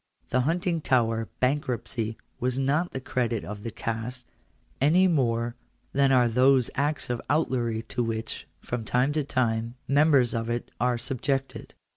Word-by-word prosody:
The 130 - +3
Huntingtower 130 -8 +1
bank 135 +3 +1
ruptcy 115 -2 -3 0.2
was 125 +1 0
not 140 +5 +2
to - - -24
the 130 - -4
credit 120 -3 -1
of 105 0 -6
the 115 - -4
caste, 115 +3 -4 0.6
any 175 +7 +5
more 120 -7 +1 0.4
than 140 0 +4
are 125 -2 +5
those 125 +2 +4
acts 145 -2 -1
of 120 - -2
outlawry 120 -7 +1
to 120 - -2
which, 115 -1 -4
from 120 -2 -4
time 125 +5 +1
to 155 -1 +1
time, 115 -3 0
members 140 -3 +4
of 115 0 -2
it 120 0 -3
are 125 -1 +2
subjected. 135 +2 -3
125 Hz, 155 wpm, -27 LUFS, 115-140 Hz, 0.6 s, any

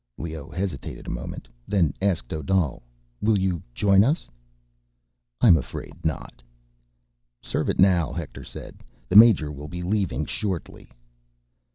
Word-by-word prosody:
Leoh 80 -1 -6
hesitated 90 +4 -5
a - - -4
moment, - - -6 0.2
then 90 -9 +2
asked 90 -11 0
Odal, 80 -3 0 0.4
"Will 110 0 +3
you 95 -4 0
join 100 +9 +4
us?" 150 +9 0 1.1
"I'm 105 -8 +8
afraid 80 +3 -6
not." 80 -5 -4 1.0
"Serve - - -2
it - - 0
now," 90 -4 +4
Hector 85 -4 -6
said. - - -10 0.3
"The 90 - -1
major 105 -9 +8
will 75 0 -8
be 90 +2 -6
leaving 90 - 0
shortly." 95 - -5
90 Hz, 130 wpm, -25 LUFS, 80-100 Hz, 1.1 s, I'm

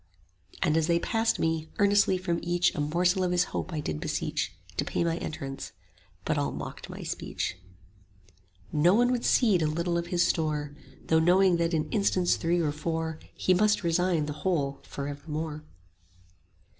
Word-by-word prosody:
And 160 -3 +2
as 160 -1 +2
they 170 -1 +3
passed 225 +5 +1
me, 160 -1 -1
earnestly 200 -2 +4
from 175 -2 -1
each 175 0 +1
A - - -5
morsel 175 +5 +2
of 180 - +1
his 180 0 +3
hope - - -3
I 155 - -2
did 80 - -3
beseech, - - -2 0.2
50 90 - -20
To - - 0
pay - - -1
my 165 0 0
entrance; 135 -3 -6 0.5
but - - +1
all - - 0
mocked - - -7
my - - -7
speech. - - -3 1.2
No 165 +5 +4
one 245 +2 +4
would 245 -2 -1
cede 210 -9 +3
a 155 - +2
little 170 +2 0
of 170 - -5
his 175 0 +2
store, 150 -3 -1 0.3
Though 160 - +3
knowing 180 +2 +4
that 170 0 +1
in 155 - 0
instants 195 -4 +2
three 170 +1 0
or 155 -3 +1
four 160 +1 -3 0.2
He 185 - +2
must 210 +2 +3
resign 170 -1 +1
the 150 - -4
whole 145 -7 0
for 140 0 -5
evermore. 150 +1 -5
170 Hz, 180 wpm, -28 LUFS, 155-180 Hz, 1.2 s, earnestly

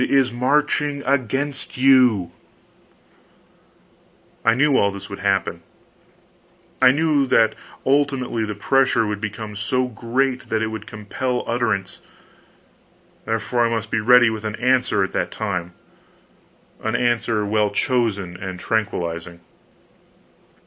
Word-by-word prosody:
is 135 -2 +3
marching 145 +3 0
against 135 +1 -2
you! 125 -9 +4 2.1
I 115 0 +4
knew 140 +2 +3
all 100 - +3
this 100 0 -9
would 100 - -6
happen; 95 -4 0 1.2
I 130 - +8
knew 145 0 +2
that 115 -3 +3 0.3
ultimately 135 -4 +1
the 105 -1 -4
pressure 125 +1 +2
would 105 -1 -3
become 110 0 -5
so 125 +5 0
great 125 +3 -2
that 110 0 0
it 110 - -1
would 110 -1 -7
compel 125 +4 -3
utterance; 110 -5 -2 1.2
therefore, 115 +2 0
I - - -2
must 115 -1 -3
be - - +1
ready 120 +1 +5
with 110 -1 -5
an 110 0 -3
answer 125 -4 +2
at 95 - -3
that 85 - -1
time 90 -5 -4 1.1
an 110 +1 -1
answer 120 -3 0
well 105 0 +1
chosen 100 -5 -1
and 95 -1 -6
tranquilizing. 85 -6 -3
115 Hz, 120 wpm, -21 LUFS, 105-130 Hz, 2.1 s, I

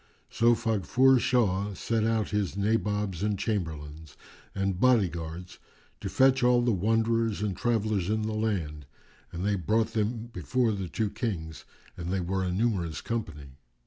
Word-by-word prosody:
So 120 +1 +4
Faghfur 125 +5 +3
Shah 100 -5 +1
sent 110 +4 0
out 110 -2 0
his 100 -2 -1
Nabobs 105 -3 0
and 105 -1 0
Chamberlains 80 -7 -4 0.4
and 95 -2 -1
body 120 -5 +4
guards 85 +2 -7 0.4
to - - -4
fetch 130 0 +4
all 125 0 +4
the 120 - +2
wanderers 115 +2 +1
and 100 -3 -1
travellers 110 -5 0
in 110 0 0
the 110 0 -2
land, 85 -10 -2 0.4
and 90 +2 -4
they 105 - +2
brought 110 +5 0
them 115 +2 -2
before 120 +6 0
the 95 -4 -4
two 110 +2 -1
Kings, 90 -9 -4 0.3
and 85 0 -6
they 95 +1 0
were 95 +2 -1
a 90 - -1
numerous 90 -6 -1
company. 75 - -5
105 Hz, 155 wpm, -28 LUFS, 90-115 Hz, 0.4 s, So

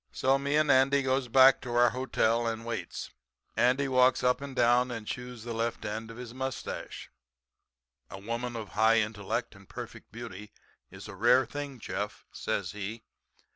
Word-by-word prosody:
"So 135 +1 +2
me 140 +1 0
and 150 -1 +4
Andy 135 +1 +4
goes 130 0 +1
back 130 +2 +6
to 120 -1 -5
our 120 -1 +5
hotel 120 -2 +1
and 115 0 -3
waits. 110 -7 -5 0.4
Andy 130 +3 +3
walks 130 -1 +4
up 125 +2 +2
and 140 -2 -7
down 125 +1 +4
and 115 -3 -5
chews 125 0 -6
the 120 0 -5
left 115 0 -2
end 110 +2 -4
of 115 - -10
his 120 -2 -8
mustache. 130 0 -5 1.0
"'A - - -8
woman 120 +3 -4
of 110 -3 -6
high 110 +1 +4
intellect 110 +2 -2
and 100 -1 -17
perfect - - -9
beauty 105 -3 -9 0.4
is - - -11
a - - -8
rare 130 +1 +4
thing, 140 +2 -6
Jeff,' - - -5
says - - -3
he. 105 +2 -6
120 Hz, 175 wpm, -29 LUFS, 115-130 Hz, 1.0 s, back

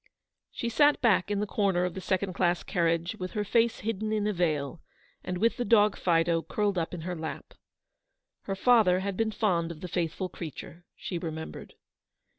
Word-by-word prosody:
She 235 - -4
sat 290 +5 +4
back 210 -6 +3
in 205 -1 0
a - - 0
corner 195 -4 +1
of 180 - -3
the 190 - -6
second 190 0 -1
class 175 -1 +1
carriage 170 0 0
with 185 0 -5
her 210 - -1
face 230 +3 +1
hidden 215 0 -2
in 215 -1 0
a 210 - +1
veil, 155 -4 -1 0.4
and 180 - -3
with 230 +7 +2
the 245 - 0
dog 210 -2 +4
Fido 165 -1 +2
curled 205 +3 -1
up 170 0 -2
in 170 - -7
her 180 +2 -4
lap. 160 -1 -6 0.9
Her 195 - -2
father 195 -4 +4
had 200 0 -3
been 225 +2 +1
fond 180 -6 0
of 165 -2 -8
the 180 - -5
faithful 175 +1 -2
creature, 170 0 -9
she 175 - -5
re 165 - -3
membered. 160 0 -8
185 Hz, 195 wpm, -28 LUFS, 170-210 Hz, 0.9 s, sat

